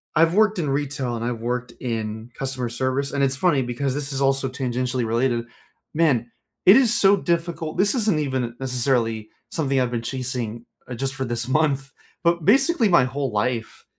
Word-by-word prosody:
I've 165 +2 +4
worked 215 -2 +3
in 150 - -1
retail 135 -3 -2
and 115 - -4
I've 120 -2 -2
worked 125 +1 -2
in 110 -1 -4
customer 130 -2 -3
service- 130 +3 -1
and 140 -1 0
it's 135 0 +2
funny 145 -2 +2
because 125 +2 -2
this 145 -1 -4
is 135 - -2
also 135 0 +2
tangentially 125 -1 -2
related- 120 0 0 0.5
man, 130 -8 +2 0.4
it 190 - +10
is 240 -4 +4
so 200 -2 +5
difficult, 170 -3 -2
this 200 +5 +3
isn't 210 -9 +1
even 130 -5 -2
necessarily 120 -4 0 0.2
something 140 -4 0
I've 125 -1 0
been 120 - -2
chasing, 120 -2 -4 0.2
uh, 125 - -6
just 135 +2 -3
for 130 0 -2
this 120 0 -3
month, 140 -1 +1 0.3
but 170 -2 +1
basically 270 - +4
my 170 -8 +5
whole 135 0 -3
life 115 +2 -2
135 Hz, 180 wpm, -23 LUFS, 120-155 Hz, 0.5 s, it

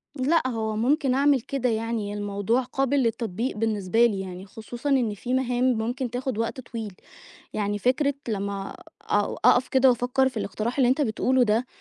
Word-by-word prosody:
لأ، 295 +5 +2
هو 220 -3 -2
ممكن 265 +4 +2
أعمل 275 0 +3
كده 255 +1 -1
يعني، 225 -2 -2
الموضوع 205 +3 0
قابِل 270 +2 0
للتطبيق 230 0 -2
بالنسبة 220 0 +2
لي 210 -5 0
يعني، 185 0 -7
خصوصًا 235 +6 -6
إن 250 -6 +2
في 240 +5 -4
مهام 250 -1 0
ممكن 245 +3 -2
تاخد 250 0 -3
وقت 230 +3 -2
طويل. 225 -4 -7 0.6
يعني 205 -1 -1
فكرة 270 +6 +1
لمّا 200 -2 -3 0.3
أو 205 0 0
أقَف 250 +1 +5
كده 265 0 +4
وأفكّر 250 +2 +2
في 255 - -13
الإقتراح 220 +4 -3
اللي 255 -3 +4
أنت 260 +4 +2
بتقوله 255 0 +2
ده، 230 +2 +2
235 Hz, 170 wpm, -25 LUFS, 215-260 Hz, 0.6 s, أقَف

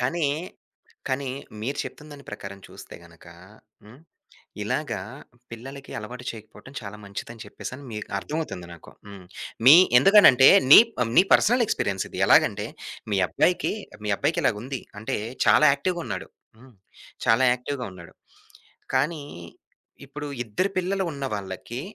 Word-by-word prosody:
కానీ, 145 +6 0 0.8
కానీ 135 +1 -2 0.3
మీరు 140 +4 -3
చెప్తున్న 150 +1 -10
దాని 140 -1 -13
ప్రకారం 100 -1 -8
చూస్తే - - -13
గనక 85 0 -18 0.6
హ్మ్, 110 +6 -16 0.7
ఇలాగా - - -2 0.5
పిల్లలకి 135 +4 -10
అలవాటు 125 +3 -9
చేయకపోవటం 110 +4 -14
చాలా 105 0 -9
మంచిదని 110 +3 -8
చెప్పేసని 130 +6 -9
మీకు 105 -1 -6
అర్థమవుతుంది 150 - -5
నాకు. 85 - -15 0.2
హ్మ్. 100 -2 -12 0.4
మీ 135 +4 +10 0.2
ఎందుకని 200 +7 +7
అంటే 130 +1 +6 0.2
నీ - - +13 0.4
నీ 180 - +7
పర్సనల్ 240 +3 +4
ఎక్స్‌పీరియన్స్ 100 - -2
ఇది. - - -7
ఎలాగంటే - - +3 0.4
మీ 100 - +1
అబ్బాయికి, 180 - +1 0.3
మీ 105 - 0
అబ్బాయికిలా 155 +1 +1
ఉంది 130 0 -6 0.2
అంటే, 110 - -3 0.3
చాలా 150 - +6
యాక్టివ్‌గున్నాడు 170 +4 -4 0.3
హ్మ్. 130 0 -18 0.5
చాలా 115 +3 +4
యాక్టివ్‌గా 125 +1 -5
ఉన్నాడు. 85 -2 -13 0.8
కానీ, 155 0 0 0.8
ఇప్పుడు 145 +2 -7 0.2
ఇద్దరు 120 - -1
పిల్లలు 190 +1 -1
ఉన్నవాళ్ళకి, 115 -3 -5
130 Hz, 125 wpm, -24 LUFS, 105-150 Hz, 0.8 s, నీ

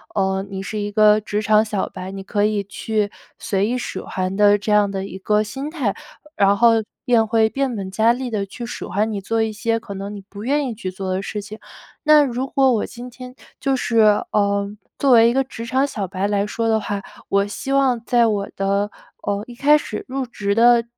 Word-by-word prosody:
呃， 190 0 0
你 190 0 -5
是 215 +2 -5
一 205 0 -3
个 215 0 +5
职 210 0 -2
场 215 0 +4
小 210 -3 -2
白， 185 +1 -7
你 195 0 -6
可 205 +1 0
以 210 -1 0
去 205 +1 -2 0.3
随 195 0 0
意 245 +2 -1
使 250 - -5
唤 185 0 -3
的， 205 0 +5
这 210 +1 -2
样 205 -1 +4
的 195 -1 -3
一 190 - -8
个 210 +2 +1
心 270 +7 -5
态。 255 - -1 0.4
然 200 0 +4
后 235 0 +6 0.3
便 235 -3 +3
会 220 0 +3
变 270 +1 -1
本 195 -2 -5
加 220 +4 +3
厉 250 +1 -4
地 200 -3 -1
去 240 +5 -7
使 235 - -6
唤 215 +3 0
你， 200 -2 -3
做 225 +3 0
一 220 -1 -2
些 230 +2 -1
可 200 - -8
能 200 +1 -6
你 200 - -8
不 200 +1 -9
愿 285 +3 +1
意 240 - -3
去 200 -4 -5
做 190 0 -4
的 190 - -1
事 210 - -4
情。 210 +2 -10 0.4
那 305 -1 +6
如 255 0 -2
果 265 -1 +3
我 215 - 0
今 245 +1 -9
天 255 +1 -10 0.2
就 270 -1 +1
是 230 -3 0 0.3
呃， 200 -1 +1 0.3
作 275 -2 +2
为 230 -1 +7
一 235 - 0
个 270 - +2
职 240 -3 -8
场 260 +3 +2
小 210 -9 -4
白 190 +2 -2
来 205 0 +1
说 225 +2 -2
的 220 -1 +3
话， 205 -1 -3 0.3
我 200 0 +2
希 270 +6 -5
望 260 -4 +2
在 240 0 +3
我 205 -2 -1
的， 200 +1 0 0.3
呃， 200 0 -1
一 245 - -11
开 290 +4 +5
始 215 -7 -5
入 265 0 -3
职 200 -4 -2
的 235 +1 +5
215 Hz, 245 characters per minute, -21 LUFS, 200-240 Hz, 0.4 s, 为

